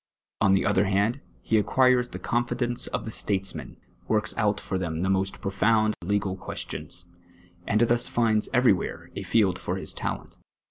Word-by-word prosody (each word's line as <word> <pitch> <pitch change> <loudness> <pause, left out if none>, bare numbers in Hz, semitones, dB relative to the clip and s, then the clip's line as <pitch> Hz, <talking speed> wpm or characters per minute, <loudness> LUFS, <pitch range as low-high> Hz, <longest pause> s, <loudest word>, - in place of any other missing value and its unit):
On 95 0 +5
the 95 - +1
other 100 0 +3
hand, 100 +7 +1 0.2
he 110 -1 +3
ac(piircs 125 +2 +3
the - - -6
confidence 120 0 -1
of - - -3
the 110 - -4
statesmen, 95 -3 -2 0.3
works 105 -3 +1
out 105 -2 +1
for 95 - -3
them 85 -2 -2
the 95 - +1
most 95 0 0
profound 110 +3 +2
legal 100 0 0
cpicstions, 90 -2 -6 0.6
and 105 +2 +2
thus 120 0 +3
finds 110 -3 +1
everj'where 125 -7 +1
a - - -4
field 100 -6 +2
for - - -3
his - - -4
tident. - - -5
105 Hz, 165 wpm, -26 LUFS, 95-120 Hz, 0.6 s, On